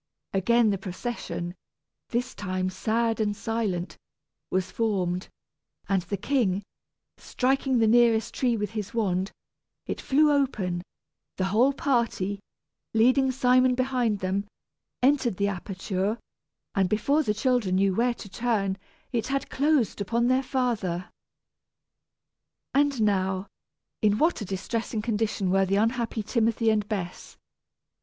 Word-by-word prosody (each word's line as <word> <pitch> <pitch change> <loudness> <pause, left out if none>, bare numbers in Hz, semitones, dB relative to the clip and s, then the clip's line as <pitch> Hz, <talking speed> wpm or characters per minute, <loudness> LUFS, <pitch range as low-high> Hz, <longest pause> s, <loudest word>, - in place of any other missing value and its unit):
Again 220 +3 +3
the 195 - -1
procession 175 -3 -5 0.6
this 245 +1 -1
time 185 -1 -2
sad 225 +4 0
and 205 -1 0
silent 200 -4 -2 0.5
was 185 0 -1
formed, 185 -5 -1 0.6
and 195 -2 +2
the 190 +3 -4
king 205 -4 +1 0.5
striking 265 0 0
the 225 - +4
nearest 230 0 +4
tree 245 -3 +1
with 210 0 -3
his 215 -1 -5
wand, 190 -4 0 0.5
it - - -4
flew 300 +2 +4
open; 215 -11 0 0.6
the 185 - 0
whole 250 +6 +5
party, 235 - 0 0.6
leading 255 +4 +4
Simon 255 0 +4
behind 250 -5 0
them, 195 +2 -1 0.6
entered 260 -7 +3
the 200 0 +1
aperture, 195 +2 -2 0.6
and 190 -2 +2
before 275 +9 +2
the 210 -8 0
children 240 -5 +1
knew 195 0 +3
where 240 +4 +1
to 210 - -10
turn, 200 -3 -1 0.3
it 235 -4 -1
had 275 0 -2
closed 280 -7 +1
upon 235 +4 +1
their 255 +2 +3
father. 225 -10 -1 1.6
And 280 -4 +2
now, 190 -2 +1 0.6
in 210 -1 +3
what 320 0 +2
a - - -3
distressing 210 +3 -3
condition 210 -4 0
were 195 0 +3
the 195 - +1
unhappy 225 +1 0
Timothy 225 0 +2
and 210 -1 0
Bess! 190 -5 -5
220 Hz, 130 wpm, -27 LUFS, 195-245 Hz, 1.6 s, whole